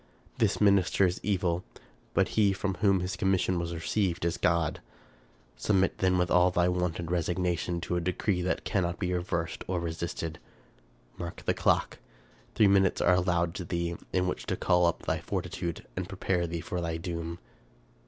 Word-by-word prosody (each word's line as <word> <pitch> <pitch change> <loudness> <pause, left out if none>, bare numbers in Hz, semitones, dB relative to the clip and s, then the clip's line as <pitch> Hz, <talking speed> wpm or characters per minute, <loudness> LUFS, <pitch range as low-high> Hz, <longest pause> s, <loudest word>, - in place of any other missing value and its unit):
This - - +2
minister 100 -2 +4
is 90 0 0
evil, 90 -3 0 0.5
but - - +3
he 105 -3 +3
from 95 0 -2
whom 100 -3 +4
his 90 +2 -2
commission 95 -2 +1
was 85 0 -3
received 85 +1 -1
is 85 - +1
God. 85 -3 +1 0.8
Submit 95 +8 +1
then 95 -1 +3
with 90 -1 +1
all 90 0 +5
thy 90 -1 +2
wonted 90 -2 -1
resignation 90 0 0
to 90 - -1
a - - 0
decree 90 +2 0
that 90 - -1
cannot 85 -3 0
be 90 -2 -1
reversed 85 -2 -2
or 90 -1 -1
resisted. 85 -1 -4 0.8
Mark 85 -1 -6
the - - +2
clock. - - +1 0.6
Three 110 - +5
minutes 95 -1 +4
are 90 - +4
allowed 90 -2 +1
to 95 -1 -5
thee, 85 0 -2 0.2
in 90 0 +1
which 90 - -3
to - - -1
call 90 0 +3
up 85 - -1
thy - - -1
fortitude 85 -1 -4
and 95 0 -4
prepare 95 -3 -1
thee 85 0 -4
for 90 +2 -3
thy 85 -1 -2
doom." 85 0 -4
90 Hz, 175 wpm, -29 LUFS, 85-95 Hz, 0.8 s, all